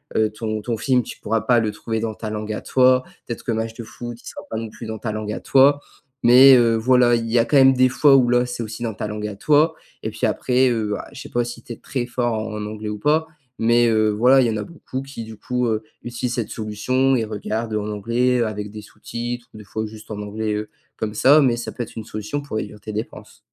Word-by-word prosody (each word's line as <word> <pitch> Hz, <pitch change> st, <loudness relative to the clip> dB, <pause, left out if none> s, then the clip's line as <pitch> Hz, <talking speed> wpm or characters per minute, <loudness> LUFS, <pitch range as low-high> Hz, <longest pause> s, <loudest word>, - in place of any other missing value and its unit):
heu, 110 Hz, -1 st, +3 dB
ton 110 Hz, 0 st, -4 dB
ton 115 Hz, +1 st, -3 dB
film, 125 Hz, +1 st, +2 dB
tu -, -, -10 dB
pourras 110 Hz, +1 st, -1 dB
pas 120 Hz, +3 st, +3 dB
le 110 Hz, -2 st, 0 dB
trouver 110 Hz, +1 st, -4 dB
dans 110 Hz, 0 st, -2 dB
ta 110 Hz, 0 st, -6 dB
langue 105 Hz, 0 st, -4 dB
à -, -, -5 dB
toi, 130 Hz, 0 st, +4 dB, 0.2 s
peut-être 120 Hz, -, -5 dB
que -, -, -2 dB
match 110 Hz, 0 st, -2 dB
de 115 Hz, -, -8 dB
foot, 120 Hz, +2 st, -8 dB
il -, -, -22 dB
sera -, -, -8 dB
pas -, -, -5 dB
non 115 Hz, 0 st, -4 dB
plus 115 Hz, -, -10 dB
dans 110 Hz, 0 st, -5 dB
ta 110 Hz, -, -3 dB
langue 105 Hz, 0 st, -4 dB
à -, -, -6 dB
toi, 140 Hz, +2 st, +4 dB, 0.4 s
mais 130 Hz, +3 st, +9 dB
heu, 115 Hz, -2 st, +4 dB
voilà. 120 Hz, +1 st, +4 dB
Il 115 Hz, -1 st, -2 dB
y 120 Hz, +1 st, +3 dB
a -, -, +5 dB
quand 145 Hz, -, +2 dB
même 135 Hz, 0 st, +7 dB
des 130 Hz, 0 st, +4 dB
fois 140 Hz, +2 st, +5 dB
où 125 Hz, -3 st, +4 dB
là, 125 Hz, 0 st, +3 dB
c'est 125 Hz, -1 st, -4 dB
aussi 110 Hz, +2 st, -7 dB
dans 115 Hz, -2 st, -2 dB
ta 105 Hz, -, -4 dB
langue 105 Hz, 0 st, -4 dB
à 105 Hz, -, -6 dB
toi 150 Hz, +9 st, +3 dB, 0.3 s
et -, -, -4 dB
puis -, -, -2 dB
après, 130 Hz, 0 st, +2 dB
heu, 110 Hz, -3 st, -1 dB
ah, -, -, -9 dB
je -, -, -11 dB
sais -, -, -9 dB
pas 120 Hz, -, 0 dB
si 120 Hz, 0 st, -7 dB
tu 120 Hz, -, -8 dB
es -, -, -9 dB
très 125 Hz, -3 st, -3 dB
fort 120 Hz, -1 st, -1 dB
en 110 Hz, -1 st, -4 dB
anglais 105 Hz, 0 st, -6 dB
ou 105 Hz, 0 st, -5 dB
pas, 155 Hz, +6 st, +2 dB, 0.3 s
mais 120 Hz, +1 st, +4 dB
heu, 110 Hz, -1 st, +3 dB
voilà, 125 Hz, +6 st, +5 dB
il 125 Hz, -, +3 dB
y -, -, +1 dB
en 110 Hz, -, -1 dB
a 105 Hz, -, -3 dB
beaucoup 135 Hz, -4 st, -7 dB
qui, 135 Hz, -4 st, -8 dB
du 110 Hz, -1 st, -10 dB
coup, 125 Hz, +3 st, -1 dB
heu, 110 Hz, -1 st, -1 dB, 0.2 s
utilisent 120 Hz, 0 st, -3 dB
cette 115 Hz, -3 st, -2 dB
solution, 130 Hz, +5 st, 0 dB
et 115 Hz, -3 st, 0 dB
regardent 110 Hz, +1 st, -3 dB
en 105 Hz, 0 st, -2 dB
anglais, 120 Hz, +5 st, +1 dB
heu, 115 Hz, -, +2 dB
avec 105 Hz, -1 st, -5 dB
des 105 Hz, 0 st, -8 dB
sous-titres, 120 Hz, +3 st, -6 dB
ou -, -, -11 dB
des -, -, -10 dB
fois 110 Hz, +2 st, -4 dB
juste 110 Hz, 0 st, -11 dB
en 105 Hz, -2 st, -5 dB
anglais, 105 Hz, +1 st, -3 dB
heu, 105 Hz, 0 st, -4 dB, 0.3 s
comme 105 Hz, -1 st, -3 dB
ça, 140 Hz, +7 st, +6 dB
mais 125 Hz, -4 st, +2 dB
ça 120 Hz, -, -5 dB
peut 120 Hz, -, -4 dB
être 115 Hz, -, -12 dB
une 110 Hz, -, -5 dB
solution 110 Hz, +7 st, -4 dB
pour 140 Hz, -6 st, -5 dB
réduire 105 Hz, -, -5 dB
tes 110 Hz, -, -7 dB
dépenses. 105 Hz, -1 st, -7 dB
115 Hz, 275 wpm, -22 LUFS, 110-125 Hz, 0.4 s, mais